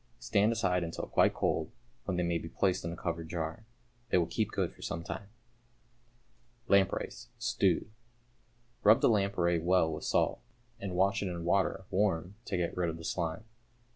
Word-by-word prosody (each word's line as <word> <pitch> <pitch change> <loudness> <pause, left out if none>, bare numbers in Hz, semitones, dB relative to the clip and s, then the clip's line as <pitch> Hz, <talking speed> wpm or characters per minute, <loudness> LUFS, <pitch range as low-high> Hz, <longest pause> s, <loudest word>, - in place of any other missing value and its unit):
Stand 100 - +2
aside 90 -6 +1
until 85 0 -4
quite - - +3
cold, - - 0 0.4
when 95 -2 -1
they 90 - +1
may 85 -1 0
be 85 - -7
placed 95 0 +1
in 85 - -3
a - - -5
covered 85 -2 -3
jar. 85 +7 -4 0.4
They - - +4
will 85 - +3
keep - - -1
good - - -1
for - - -18
some 85 0 -4
time. 100 +3 -6 1.4
=Lampreys, 100 -3 +1
Stewed.= - - +1 0.9
Rub 110 +5 +6
the - - +5
lamprey 100 -5 +2
well 85 -1 +3
with 75 - -6
salt, - - +1 0.4
and 95 -2 -4
wash 95 +2 +2
it 100 - -1
in 85 -2 -4
water 95 +1 +1
(warm) 95 -2 +1
to 95 - -2
get 85 -1 -1
rid 90 -2 0
of 80 - -4
the 80 - -9
slime. 85 +3 -2
90 Hz, 175 wpm, -31 LUFS, 85-100 Hz, 1.4 s, Rub